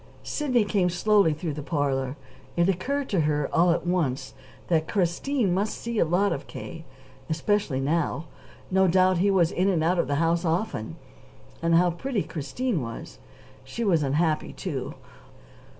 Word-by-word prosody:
Sidney 255 Hz, -7 st, +1 dB
came 195 Hz, -3 st, +1 dB
slowly 200 Hz, 0 st, +3 dB
through 155 Hz, +1 st, -3 dB
the 150 Hz, -, -5 dB
parlor. 140 Hz, -3 st, -1 dB, 0.4 s
It 170 Hz, +1 st, +4 dB
occurred 260 Hz, +10 st, -1 dB
to 195 Hz, -, +1 dB
her, 150 Hz, -2 st, +1 dB
all 175 Hz, +2 st, +4 dB
at 170 Hz, -, +1 dB
once, 165 Hz, -8 st, -1 dB, 0.3 s
that 160 Hz, -2 st, +1 dB
Christine 195 Hz, +4 st, 0 dB
must 200 Hz, +4 st, -1 dB
see 235 Hz, -2 st, -3 dB
a -, -, +4 dB
lot 185 Hz, +5 st, +2 dB
of -, -, -6 dB
K., -, -, -8 dB, 0.4 s
especially 165 Hz, -2 st, 0 dB
now. 160 Hz, +3 st, 0 dB, 0.5 s
No 190 Hz, 0 st, +4 dB
doubt 185 Hz, 0 st, +3 dB
he 200 Hz, +3 st, +3 dB
was 180 Hz, -4 st, +3 dB
in 185 Hz, +2 st, +1 dB
and 170 Hz, -5 st, +1 dB
out 175 Hz, +2 st, +2 dB
of -, -, +1 dB
the 145 Hz, -, 0 dB
house 165 Hz, +3 st, +1 dB
often. 165 Hz, -, -2 dB, 0.7 s
And 165 Hz, 0 st, +3 dB
how 175 Hz, +1 st, +4 dB
pretty 225 Hz, +4 st, -2 dB
Christine 170 Hz, -, -2 dB
was! 115 Hz, -1 st, -7 dB, 0.4 s
She 235 Hz, -, -5 dB
was 175 Hz, -7 st, +3 dB
unhappy, 155 Hz, +3 st, 0 dB
too. -, -, -5 dB
175 Hz, 165 wpm, -26 LUFS, 155-200 Hz, 0.7 s, It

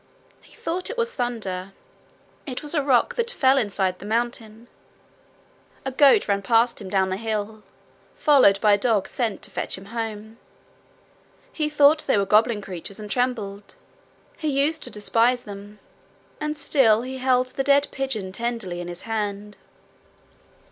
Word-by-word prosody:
He -, -, -20 dB
thought 360 Hz, +2 st, -3 dB
it 470 Hz, -, -6 dB
was 470 Hz, 0 st, -1 dB
thunder. 195 Hz, -7 st, -4 dB, 0.7 s
It 255 Hz, 0 st, -5 dB
was 295 Hz, -, -2 dB
a 300 Hz, -, +2 dB
rock 265 Hz, -4 st, +2 dB
that 470 Hz, 0 st, 0 dB
fell 270 Hz, -, +3 dB
inside 190 Hz, -5 st, -1 dB
the -, -, -10 dB
mountain. 230 Hz, 0 st, -3 dB, 1.2 s
A 265 Hz, -, -2 dB
goat 275 Hz, +1 st, +5 dB
ran 200 Hz, -1 st, +1 dB
past 230 Hz, +3 st, +2 dB
him 190 Hz, -, -7 dB
down 190 Hz, -1 st, +1 dB
the 185 Hz, -, -2 dB
hill, 215 Hz, 0 st, -4 dB, 0.5 s
followed 260 Hz, -10 st, +5 dB
by 210 Hz, -2 st, +5 dB
a 205 Hz, -, +3 dB
dog 215 Hz, -3 st, +1 dB
sent 230 Hz, -5 st, -3 dB
to -, -, -8 dB
fetch -, -, -3 dB
him 190 Hz, -, -12 dB
home. 220 Hz, -1 st, -5 dB, 1.1 s
He 305 Hz, -2 st, -1 dB
thought 300 Hz, +1 st, +4 dB
they 270 Hz, -, +3 dB
were 200 Hz, -, +2 dB
goblin 215 Hz, +1 st, +3 dB
creatures, 190 Hz, +2 st, -7 dB
and 210 Hz, -1 st, -8 dB
trembled. 225 Hz, -, -2 dB, 0.6 s
He 310 Hz, -, -4 dB
used 295 Hz, +3 st, +1 dB
to -, -, -6 dB
despise 235 Hz, +4 st, +1 dB
them. 205 Hz, +1 st, -10 dB, 0.6 s
And 300 Hz, 0 st, -3 dB
still 245 Hz, -6 st, +3 dB
he 260 Hz, +1 st, -6 dB
held 255 Hz, -1 st, +2 dB
the 270 Hz, +1 st, -3 dB
dead 280 Hz, 0 st, +4 dB
pigeon 230 Hz, -8 st, -3 dB
tenderly 230 Hz, -4 st, -4 dB
in 175 Hz, -, -7 dB
his 175 Hz, 0 st, -8 dB
hand. 210 Hz, -2 st, -4 dB
230 Hz, 160 wpm, -23 LUFS, 205-270 Hz, 1.2 s, goat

